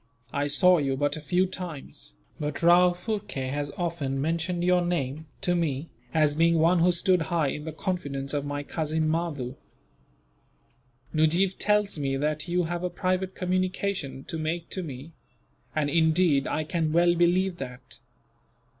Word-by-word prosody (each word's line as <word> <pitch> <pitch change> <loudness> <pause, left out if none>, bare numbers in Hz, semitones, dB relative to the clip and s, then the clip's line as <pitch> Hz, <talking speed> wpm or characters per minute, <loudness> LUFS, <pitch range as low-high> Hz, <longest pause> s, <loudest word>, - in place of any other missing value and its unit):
"I 145 0 0
saw 180 +5 +5
you 135 -2 0
but 145 +2 +1
a 155 - -7
few 180 +5 +2
times, 180 - -7 0.2
but 150 +2 -4
Rao 175 +1 +7
Phurkay 180 - -4
has 145 +1 -2
often 165 -6 -2
mentioned 165 +4 -1
your 180 0 +4
name, 160 -3 -2
to 180 -2 +1
me, 160 -3 -1 0.2
as 150 -1 +2
being 165 +1 +4
one 170 +3 +4
who 175 +2 +5
stood 180 +1 +3
high 165 -5 +1
in 150 +2 -5
the 160 - -4
confidence 145 -6 -3
of 145 -1 0
my 145 0 -3
cousin 155 +1 -1
Mahdoo. 155 -6 -2 1.6
Nujeef 170 +5 +2
tells 210 -5 +2
me 135 -1 -1
that 150 +3 -1
you 175 +1 +1
have 170 +1 -3
a 180 - 0
private 185 +1 -1
communication 185 -5 -2
to 160 - -5
make 165 +2 -3
to 190 - -2
me; 145 -1 -8 0.6
and 155 -2 +1
indeed, 160 -1 +3
I 155 +1 -1
can 160 0 -1
well 175 +2 +4
believe 175 +2 +2
that. 125 -3 -9
165 Hz, 160 wpm, -27 LUFS, 145-180 Hz, 1.6 s, Rao